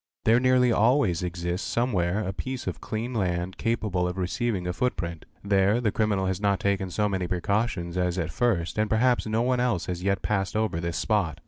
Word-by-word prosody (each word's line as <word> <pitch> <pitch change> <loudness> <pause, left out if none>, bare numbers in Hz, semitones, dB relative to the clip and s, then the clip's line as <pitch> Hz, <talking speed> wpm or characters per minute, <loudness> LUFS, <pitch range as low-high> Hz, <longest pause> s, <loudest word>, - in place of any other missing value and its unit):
There 115 +2 +5
nearly 130 -1 +4
always 110 - +3
exist 90 +1 -3
somewhere 105 -5 0
a 95 - -2
piece 130 +5 -5
of - - -4
clean 115 +3 -4
land 90 -3 -1
capable 105 -6 0
of 90 +1 -4
receiving 95 +1 -1
a 90 - -1
footprint; 85 -7 -2 0.2
ther 100 +3 +3
the 110 -4 +1
criminal 105 -3 +1
has 95 0 -2
not 100 -2 +2
taken 100 -1 0
so 105 +3 0
many 95 -3 -2
precautions 90 -1 -1
as 90 0 0
at 85 -2 -2
first 95 -4 0
and 110 0 +1
perha 120 +1 +2
no 110 +2 +1
one 125 0 +1
else 115 -9 0
has 90 -1 -4
yet 100 0 0
passed 95 -2 -1
over 110 -6 0
this 85 -1 -3
spot. 95 -6 0
100 Hz, 200 wpm, -26 LUFS, 90-115 Hz, 0.2 s, There